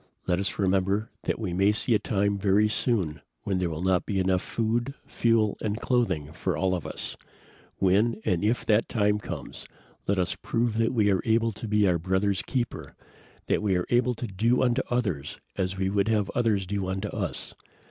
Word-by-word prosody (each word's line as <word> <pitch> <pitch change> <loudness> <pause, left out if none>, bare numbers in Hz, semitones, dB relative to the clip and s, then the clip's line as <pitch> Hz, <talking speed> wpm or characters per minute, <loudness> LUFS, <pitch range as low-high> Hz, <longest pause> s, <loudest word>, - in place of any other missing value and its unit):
Let 90 0 +1
us 100 - -1
remember 95 +2 +1
that - - 0
we 105 -6 -3
may 95 +3 +4
see 115 +3 +1
a 105 - +4
time 100 -1 0
very 100 +2 +3
soon 95 - 0 0.2
when 95 -2 -1
there 90 -2 0
will 80 +1 -4
not 95 -1 +2
be 100 -2 0
enough 95 -1 +2
food, 120 +4 -1
fuel 115 -3 +1
and 105 +1 -2
clothing 110 - 0
for - - -2
all 95 -1 +1
of 90 -4 -3
us. - - -4 0.6
When 105 +5 +2
and 90 +1 +1
if 115 +4 +1
that 110 +1 +2
time 105 -2 +2
comes, - - -7 0.4
let 100 - +2
us 90 -2 +1
prove 115 -1 0
that 115 - +2
we 105 -5 +3
are 95 - +2
able 115 0 +2
to 110 +2 -7
be 105 -1 +3
our 90 -2 +2
brother's 95 +3 0
keeper, 125 -4 -3 0.5
that - - +1
we 100 -3 +1
are 90 - 0
able 125 0 +3
to 120 - -4
do 115 +5 +1
unto 125 +1 +2
others 95 - -1 0.2
as 95 0 -2
we 95 0 0
would 100 +1 +1
have 105 -3 +1
others 110 -5 +1
do 100 0 -2
unto 95 +2 -2
us. - - -3
100 Hz, 200 wpm, -27 LUFS, 95-115 Hz, 0.6 s, may